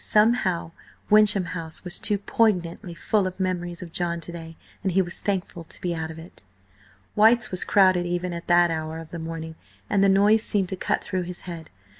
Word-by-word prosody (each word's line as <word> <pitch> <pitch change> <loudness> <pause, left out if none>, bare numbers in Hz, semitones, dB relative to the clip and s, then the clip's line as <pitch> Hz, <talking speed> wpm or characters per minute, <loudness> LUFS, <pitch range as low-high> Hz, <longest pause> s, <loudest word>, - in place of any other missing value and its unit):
Somehow, 210 -6 +2 0.4
Wyncham 210 -3 +5
House 165 -2 -6
was 180 0 -2
too 205 -1 +3
poignantly 185 -5 0
full 200 +3 0
of 185 +1 -8
memories 175 -1 -3
of 170 - -11
John 170 0 -2
to 165 - -6
day, 165 -1 -9 0.2
and 190 - -1
he 190 - +3
was 175 -2 -1
thankful 185 -4 -3
to - - -11
be 175 -1 -2
out 160 -1 -4
of 160 - -9
it 165 - -13 0.7
White's 225 +2 +4
was 185 - +1
crowded 185 -3 +3
even 175 0 -2
at 170 0 -7
that 175 -1 +4
hour 160 0 -4
of 165 -1 -10
the 170 - -6
morning, 160 0 -6 0.4
and 195 - +3
the 200 - +5
noise 205 +3 +4
seemed 195 -4 0
to 190 - -2
cut - - -1
through 185 - -2
his 180 0 -6
head. 170 -3 -8
180 Hz, 205 wpm, -24 LUFS, 170-195 Hz, 0.7 s, Wyncham